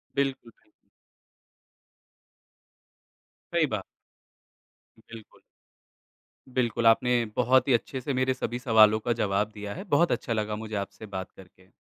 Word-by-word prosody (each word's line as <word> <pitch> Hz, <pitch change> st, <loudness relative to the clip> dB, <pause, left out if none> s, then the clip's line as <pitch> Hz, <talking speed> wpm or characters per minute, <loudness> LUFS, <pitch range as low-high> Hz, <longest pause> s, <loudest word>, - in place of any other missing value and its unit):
बिल्कुल, 135 Hz, -4 st, -2 dB
बिल्कु -, -, -35 dB, 2.8 s
सही -, -, +3 dB
बा -, -, -3 dB, 1.2 s
बिल्कुल। 110 Hz, -1 st, -14 dB, 1.1 s
बिल्कुल, 120 Hz, -2 st, -1 dB
आपने 120 Hz, +1 st, +4 dB
बहुत 130 Hz, +2 st, +3 dB
ही 135 Hz, -, +4 dB
अच्छे 130 Hz, +3 st, -1 dB
से 135 Hz, +3 st, -3 dB
मेरे 130 Hz, 0 st, +1 dB
सभी 125 Hz, -1 st, -4 dB
सवालों 110 Hz, -3 st, +5 dB
का 120 Hz, +2 st, -1 dB
जवाब 105 Hz, -1 st, 0 dB
दिया 105 Hz, -1 st, -6 dB
है, -, -, -7 dB
बहुत 170 Hz, -3 st, +2 dB
अच्छा 120 Hz, -, -1 dB
लगा 105 Hz, -1 st, -2 dB
मुझे 110 Hz, 0 st, -6 dB
आपसे 110 Hz, -, -13 dB
बात 95 Hz, -3 st, -6 dB
करके। 95 Hz, 0 st, -18 dB
115 Hz, 125 wpm, -27 LUFS, 105-130 Hz, 2.8 s, सवालों